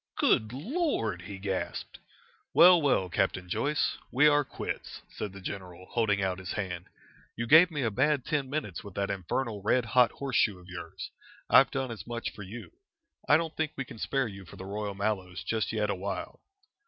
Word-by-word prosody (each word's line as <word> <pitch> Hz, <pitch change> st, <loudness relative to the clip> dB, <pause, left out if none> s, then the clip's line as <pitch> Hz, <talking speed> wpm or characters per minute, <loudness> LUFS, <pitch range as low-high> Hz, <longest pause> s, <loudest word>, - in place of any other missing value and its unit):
"Good 110 Hz, 0 st, +3 dB
Lord!" 145 Hz, -, -1 dB
he 95 Hz, +2 st, -8 dB
gasped. 95 Hz, -1 st, -4 dB, 0.6 s
"Well, 175 Hz, -1 st, +8 dB
well, 130 Hz, -10 st, +2 dB
Captain 95 Hz, 0 st, 0 dB
Joyce, 145 Hz, -, 0 dB
we 140 Hz, +4 st, +5 dB
are 145 Hz, 0 st, +5 dB
quits!" -, -, -6 dB
said 105 Hz, -, -5 dB
the 100 Hz, -, -10 dB
general, 95 Hz, -2 st, -7 dB
holding 105 Hz, -4 st, +1 dB
out 95 Hz, -1 st, -1 dB
his 95 Hz, -2 st, -5 dB
hand. 90 Hz, -3 st, -4 dB, 0.5 s
"You 115 Hz, -, -2 dB
gave 160 Hz, +8 st, +8 dB
me 150 Hz, -5 st, -2 dB
a 115 Hz, -, +1 dB
bad 135 Hz, +4 st, +2 dB
ten 145 Hz, -4 st, -1 dB
minutes 135 Hz, -, -3 dB
with 100 Hz, -2 st, -10 dB
that 100 Hz, 0 st, -1 dB
infernal 100 Hz, +3 st, -2 dB
red 120 Hz, +4 st, +2 dB
hot 125 Hz, +1 st, +4 dB
horseshoe 125 Hz, -7 st, +1 dB
of 90 Hz, 0 st, -16 dB
yours. 85 Hz, -2 st, -7 dB, 0.4 s
I've 135 Hz, -, +8 dB
done 135 Hz, -3 st, -2 dB
as 115 Hz, -, -8 dB
much 120 Hz, 0 st, -3 dB
for -, -, -10 dB
you. 105 Hz, +5 st, -8 dB, 0.6 s
I 145 Hz, -, +8 dB
don't 165 Hz, -1 st, -3 dB
think 155 Hz, -2 st, -1 dB
we 135 Hz, -, -3 dB
can 115 Hz, -, -11 dB
spare 135 Hz, +1 st, 0 dB
you 100 Hz, -2 st, -9 dB
for 90 Hz, -, -13 dB
the 95 Hz, -, -8 dB
Royal 100 Hz, 0 st, -4 dB
Mallows 95 Hz, -3 st, -2 dB
just 110 Hz, -1 st, -1 dB
yet 105 Hz, -2 st, 0 dB
awhile." 95 Hz, 0 st, -4 dB
110 Hz, 190 wpm, -29 LUFS, 95-135 Hz, 0.6 s, Well